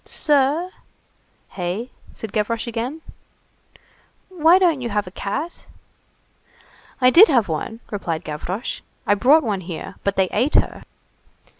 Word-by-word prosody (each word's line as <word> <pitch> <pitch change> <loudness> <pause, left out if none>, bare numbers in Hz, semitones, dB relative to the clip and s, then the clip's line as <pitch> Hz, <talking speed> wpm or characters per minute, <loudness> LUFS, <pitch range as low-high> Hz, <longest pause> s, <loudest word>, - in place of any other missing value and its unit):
"Sir?" 300 +4 +1 0.8
"Hey?" 190 +7 -4 0.2
said 220 -3 -8
Gavroche 220 +1 -1
again. 240 +7 -4 1.3
"Why 345 -1 +5
don't 340 -7 +2
you 240 - -3
have 210 -1 -1
a 180 - -10
cat?" 290 - -5 1.3
"I 255 -1 +5
did 385 - +9
have 240 - +2
one," 200 +8 -4
replied 170 -6 -3
Gavroche, 180 +9 -5 0.3
"I - - +4
brought 275 +10 +4
one 205 -5 -2
here, 180 +2 -7
but 200 0 0
they 190 -1 +2
ate 285 +5 0
her." - - +1
230 Hz, 130 wpm, -21 LUFS, 195-295 Hz, 1.3 s, did